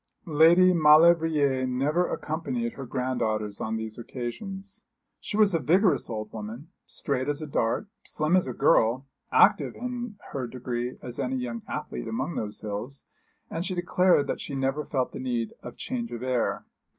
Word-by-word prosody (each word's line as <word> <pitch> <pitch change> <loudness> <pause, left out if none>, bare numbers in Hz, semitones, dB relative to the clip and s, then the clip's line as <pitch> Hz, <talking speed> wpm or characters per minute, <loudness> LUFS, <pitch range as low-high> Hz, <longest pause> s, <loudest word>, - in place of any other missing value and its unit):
Lady 170 +4 +6
Maulevrier 155 -4 +5
never 145 +8 +1
accompanied 235 +10 -3
her 135 -2 -8
granddaughters 110 -5 -2
on 110 0 -2
these 110 0 -5
occasions. 190 - -6 0.4
She 210 - -4
was 210 -3 +5
a 165 - +2
vigorous 180 - +3
old 110 -2 -5
woman, 110 +8 -7 0.2
straight 135 -1 -2
as 145 0 -1
a 155 - -5
dart, 120 - 0 0.2
slim 155 +3 0
as 185 -6 +3
a 125 - -3
girl, 120 +4 +3 0.3
active - - +4
in 245 -3 -5 0.2
her 130 -3 -3
degree 125 0 -4
as 125 +1 -5
any 130 -1 -1
young 120 -2 -3
athlete - - -5
among 130 +9 -2
those 105 -6 -4
hills, 110 +6 -5 0.5
and 165 - -2
she 185 0 -2
declared 180 -3 +3
that - - -3
she 140 - -5
never 135 +2 -1
felt 130 -3 -1
the - - -7
need 120 -3 -2
of 120 - -9
change 235 -2 -4
of 120 - -5
air. 125 -2 -1
135 Hz, 165 wpm, -27 LUFS, 120-170 Hz, 0.5 s, Lady